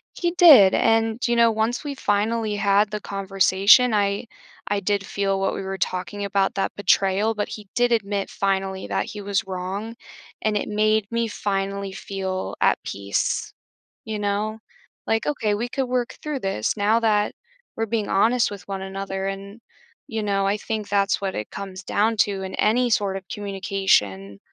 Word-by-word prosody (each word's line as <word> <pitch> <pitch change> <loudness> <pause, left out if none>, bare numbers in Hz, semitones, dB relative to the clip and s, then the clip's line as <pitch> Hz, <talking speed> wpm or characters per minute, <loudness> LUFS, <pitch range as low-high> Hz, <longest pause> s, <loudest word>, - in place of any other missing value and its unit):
He 345 -1 0
did, 295 - +8
and, 225 +1 +2
you 240 - +1
know, 235 -1 +5
once 220 +4 -1
we 285 -2 -4
finally 215 -1 0
had 205 +1 +3
the 210 - -3
conversation, 195 +4 +4
I 200 +2 0 0.4
I 205 0 0
did 200 +1 0
feel 195 -1 -1
what 195 - 0
we - - -4
were 190 0 -4
talking 185 +3 -2
about, 195 -1 +1
that 195 - -2
betrayal, 205 +2 +2
but 210 -1 -2
he 210 -3 -9
did 245 0 +2
admit 200 -3 0
finally 195 -1 -2
that - - -1
he 210 - -7
was 200 +1 -1
wrong, 190 +5 -4 0.5
and 215 -1 0
it - - -3
made 215 0 +1
me 230 0 0
finally 200 -1 -2
feel 190 -1 -4
at - - +2
peace, 100 0 -2 0.5
you 220 -1 -4
know? 210 +2 -2 0.5
Like, 225 0 +1
"Okay, 220 -8 0
we 235 +4 -3
could 270 0 -1
work 250 0 -2
through 300 -3 -3
this 195 - -1
now 210 +3 +3
that 210 -2 +1 0.4
we're 225 - -1
being 220 -1 -1
honest 225 +4 +3
with 200 -2 -9
one 195 -1 -4
another, 195 0 -4
and" 200 +3 -7 0.5
you 220 -5 -3
know, 200 -1 0
I 200 +2 +1
think 215 -1 -4
that's 200 -1 +2
what 195 -1 -2
it 105 - -4
comes 190 -1 -7
down 220 +2 +1
to 200 -2 +1
in 190 0 -6
any 245 +4 +2
sort 200 -3 +1
of 190 -1 -11
communication, 190 - 0
205 Hz, 175 wpm, -23 LUFS, 195-220 Hz, 0.5 s, did